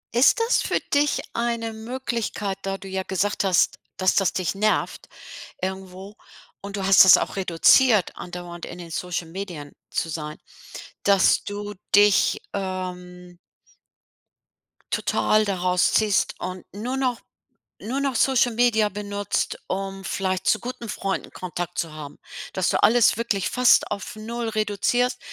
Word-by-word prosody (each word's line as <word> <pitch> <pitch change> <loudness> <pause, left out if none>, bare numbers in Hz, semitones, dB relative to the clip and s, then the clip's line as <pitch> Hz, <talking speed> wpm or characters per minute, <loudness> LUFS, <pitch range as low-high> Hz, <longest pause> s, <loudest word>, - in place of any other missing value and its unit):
Ist 245 - +5
das 460 +2 +2
für - - 0
dich 285 -1 +2
eine 230 -1 -2
Möglichkeit, 225 -4 -4
da 195 0 -3
du 195 - -11
ja 190 0 -3
gesagt 200 +2 -1
hast, 190 -2 +2 0.2
dass 185 -1 +2
das 195 - +3
dich 185 0 -2
nervt 215 +2 -1 0.5
irgendwo 190 +2 -6 0.4
und 200 0 -8
du 195 - -3
hast 195 0 +8
das 190 - +9
auch - - -3
reduziert 195 +4 +4
andauernd 175 -1 -8
in 175 - -9
den 170 -2 -9
Social-Medien 170 -2 -5 0.2
zu 165 - -2
sein, 150 -1 -5 0.7
dass 200 -2 +4
du 205 0 -6 0.2
dich, 205 -1 +4
ähm 180 -2 -6 1.5
total 215 0 +2
daraus 180 -2 +1
ziehst 215 -2 +2
und 185 0 -6
nur 245 +6 -4
noch 250 -3 -1 0.6
nur 255 +6 -3
noch 275 -2 -1
Social-Media 240 -3 +3
benutzt, 205 0 -3
um 195 0 -4
vielleicht 185 -1 -2
zu - - +3
guten 240 -1 -6
Freunden 195 -2 -3
Kontakt 175 -1 -6
zu 165 - -2
haben, 150 -2 -9 0.4
dass 190 -2 0
du - - +1
alles 235 -2 +5
wirklich 215 -5 -1
fast 250 -1 +4
auf 205 0 -5
0 230 +2 -5
reduzierst. 215 +4 0
200 Hz, 135 wpm, -24 LUFS, 185-225 Hz, 1.5 s, das